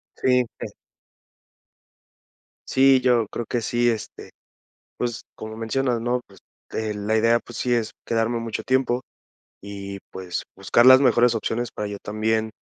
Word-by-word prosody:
Sí, 125 -1 +2
pues. - - -6 2.0
Sí, 135 0 +5
yo 120 -3 +2
creo 120 - -4
que 120 +2 -2
sí, 120 +2 +1
este, 110 -2 -5 0.7
pues, 120 -2 -3
como 110 0 -8
mencionas, 120 +2 -1
¿no? 120 +2 0
Pues, - - -18 0.3
eh, 110 -1 -3
la 105 +2 -1
idea, 115 +1 +3
pues, 120 - -10
sí 125 -1 +1
es 115 -2 0 0.2
quedarme 115 +1 0
mucho 115 -1 -4
tiempo 130 -1 +1 0.6
y, 100 0 -7
pues, 90 -2 -5
buscar 100 +5 +3
las 130 +1 +9
mejores 120 -2 +4
opciones 115 +2 -2
para 105 -1 -4
yo 100 - -5
también, 110 +1 -1
115 Hz, 145 wpm, -23 LUFS, 110-125 Hz, 2.0 s, las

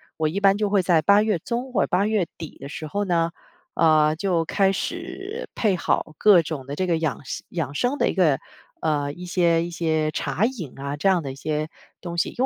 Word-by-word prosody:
我 155 -1 0
一 185 +6 -2
般 195 -1 +5
就 210 0 0
会 200 -1 +3
在 175 -3 +3
八 200 +6 +5
月 215 -3 +1
中 245 +8 -4
或 220 - +3
八 185 +3 +2
月 215 -4 +1
底 160 -2 -8
的 140 - -9
时 155 +1 -6
候 205 +7 -1
呢， 170 -3 +1 0.4
呃， 155 -1 +4
就 170 -1 0
开 195 +3 +2
始， 395 - -5
配 210 -4 +2
好 155 -2 -1
各 205 -5 +6
种 155 -4 -5
的 140 - -6
这 185 +5 -1
个 170 -2 +2
养 155 -3 -1
生 - - -5
养 165 -5 -3
生 245 - 0
的 - - +2
一 - - 0
个， 160 -8 +3 0.4
呃， 145 -2 0
一 175 +5 -9
些 170 -2 +2
一 - - -5
些 160 -2 0
茶 155 +7 0
饮 215 - -4
啊， 140 +1 -3
这 175 +7 +2
样 185 -3 +3
的 135 -3 -5
一 - - -11
些 150 +2 -2 0.3
东 170 -1 -6
西。 170 - +1
因 255 - -1
170 Hz, 245 characters per minute, -24 LUFS, 155-200 Hz, 0.4 s, 各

